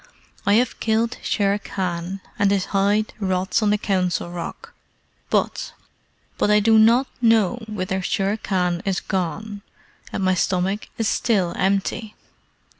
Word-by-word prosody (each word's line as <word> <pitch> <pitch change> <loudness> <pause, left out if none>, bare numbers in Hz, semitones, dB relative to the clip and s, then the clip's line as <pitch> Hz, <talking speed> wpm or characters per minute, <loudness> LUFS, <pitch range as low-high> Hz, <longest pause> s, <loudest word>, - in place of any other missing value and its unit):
I 200 - +5
have 240 +1 +1
killed 225 +2 0
Shere 200 -1 +1
Khan, 185 -1 -4 0.2
and 200 - +4
his 195 -2 +1
hide 205 +2 +2
rots 190 +1 0
on 210 - +2
the 210 - +3
Council 180 -4 -1
Rock; 175 - -7 0.6
but - - -1 0.7
but - - +2
I 210 0 +5
do 220 +1 +5
not 235 +4 +5 0.2
know 225 -1 +3
whither 190 -2 -2
Shere 195 +2 0
Khan 180 -4 -1
is 195 -2 0
gone, 195 +3 -3 0.5
and 195 - -2
my 185 0 +3
stomach 185 +3 0
is 225 - 0
still 195 -8 +1
empty. 200 +3 -1
200 Hz, 140 wpm, -22 LUFS, 185-215 Hz, 0.7 s, I